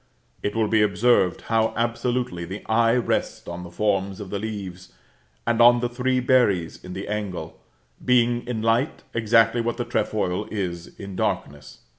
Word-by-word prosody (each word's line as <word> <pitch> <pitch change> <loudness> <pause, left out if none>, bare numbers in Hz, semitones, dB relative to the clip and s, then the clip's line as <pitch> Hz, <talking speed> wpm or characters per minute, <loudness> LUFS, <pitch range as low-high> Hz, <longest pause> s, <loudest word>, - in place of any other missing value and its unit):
It 105 - -2
will 110 -1 +2
be 110 0 +3
observed 105 -3 +3
how 115 0 0
absolutely 120 -5 -1
the 95 +4 -7
eye 115 +1 +3
rests 125 - -1
on 85 +1 -6
the 90 - -8
forms 95 0 -1
of 100 -3 -8
the 100 - -2
leaves, 95 - -6 0.5
and 115 0 +2
on 120 +1 +7
the 120 0 -1
three 130 +1 0
berries 120 -10 +2
in 90 - -8
the 95 +2 -6
angle, 105 -3 -4 0.4
being 120 -1 +2
in 115 -3 -3
light 115 +6 +1
exactly 115 +1 +3
what 120 +1 -2
the - - -2
trefoil 90 +4 -1
is 90 -5 -5
in 100 -2 -7
darkness. 75 -5 -3
110 Hz, 165 wpm, -24 LUFS, 95-120 Hz, 0.5 s, on